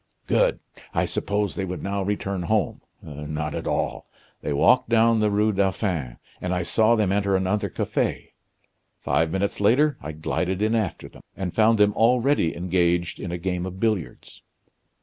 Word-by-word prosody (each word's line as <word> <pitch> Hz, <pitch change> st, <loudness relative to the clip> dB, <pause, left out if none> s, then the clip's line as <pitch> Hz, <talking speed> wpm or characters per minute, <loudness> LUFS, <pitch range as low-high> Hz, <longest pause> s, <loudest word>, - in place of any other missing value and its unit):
Good! -, -, +2 dB, 0.4 s
I -, -, +2 dB
supposed 100 Hz, 0 st, -1 dB
they 95 Hz, -, -2 dB
would 90 Hz, -1 st, -5 dB
now 100 Hz, 0 st, -2 dB
return 100 Hz, -1 st, -2 dB
home. 105 Hz, +4 st, 0 dB, 0.2 s
Not 75 Hz, +1 st, -5 dB
at -, -, -4 dB
all. -, -, -2 dB, 0.3 s
They -, -, -3 dB
walked 110 Hz, -, +3 dB
down 115 Hz, 0 st, +4 dB
the 105 Hz, -1 st, +2 dB
Rue 105 Hz, +1 st, +2 dB
Dauphin; 95 Hz, -, -1 dB, 0.2 s
and 90 Hz, 0 st, -1 dB
I 90 Hz, -, -1 dB
saw 110 Hz, +6 st, +3 dB
them 105 Hz, -4 st, +1 dB
enter 100 Hz, -1 st, +1 dB
another 95 Hz, +2 st, 0 dB
cafe. -, -, -2 dB, 0.7 s
Five 80 Hz, 0 st, +1 dB
minutes 100 Hz, +2 st, -2 dB
later 140 Hz, +8 st, +3 dB
I 80 Hz, -, -6 dB
glided 90 Hz, +4 st, -2 dB
in 110 Hz, +2 st, +1 dB
after 110 Hz, -6 st, -2 dB
them; -, -, -16 dB, 0.2 s
and 95 Hz, -3 st, -3 dB
found 110 Hz, +1 st, +4 dB
them 105 Hz, 0 st, +4 dB
already 120 Hz, -, +2 dB
engaged 85 Hz, -1 st, 0 dB
in 90 Hz, -, -5 dB
a 90 Hz, -, -2 dB
game 90 Hz, 0 st, -2 dB
of 95 Hz, 0 st, -8 dB
billiards." 105 Hz, -7 st, -3 dB
95 Hz, 170 wpm, -24 LUFS, 90-110 Hz, 0.7 s, down